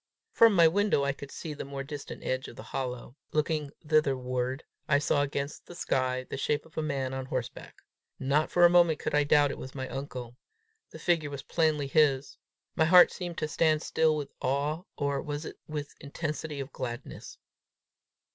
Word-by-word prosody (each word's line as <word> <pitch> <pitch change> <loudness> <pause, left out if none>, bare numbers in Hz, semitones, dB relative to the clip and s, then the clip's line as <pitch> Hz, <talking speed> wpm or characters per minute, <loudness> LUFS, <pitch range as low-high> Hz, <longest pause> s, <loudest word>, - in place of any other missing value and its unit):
From 230 -2 +6
my 170 -2 +7
window 200 -3 +2
I 140 0 +1
could 140 0 -10
see 155 +1 -6
the 145 - -6
more 140 0 -5
distant 145 0 -8
edge 130 0 -2
of - - -11
the - - -9
hollow: 125 -1 -5 0.2
looking 155 -1 0 0.2
thitherward, 130 -3 +1 0.3
I 140 - +5
saw 145 0 +2
against 140 +1 -3
the 175 - -10
sky 130 -6 0
the - - -5
shape 145 +2 -1
of 160 - -19
a - - -1
man 135 -4 -2
on 130 0 -4
horseback. 130 -2 -5 0.3
Not 140 +4 +1
for 175 0 +5
a - - +8
moment 170 -3 +5
could - - -3
I 150 0 +4
doubt 145 -1 +4
it - - -7
was 130 - -8
my 130 -1 -4
uncle. 125 -3 -6 0.5
The - - -10
figure 165 -4 +1
was 140 -1 -6
plainly 155 -3 +1
his. 140 -1 +2 0.4
My 160 - +3
heart 180 +2 +8
seemed 175 -2 -6
to 155 - -1
stand 155 0 +2
still 160 -1 +2
with 145 -2 -4
awe, 145 +6 -1
or 140 -1 0
was 145 +1 -4
it - - -8
with 150 -2 -5
intensity 150 0 -4
of 135 +1 -6
gladness? 120 -2 -6
145 Hz, 190 wpm, -29 LUFS, 135-155 Hz, 0.5 s, a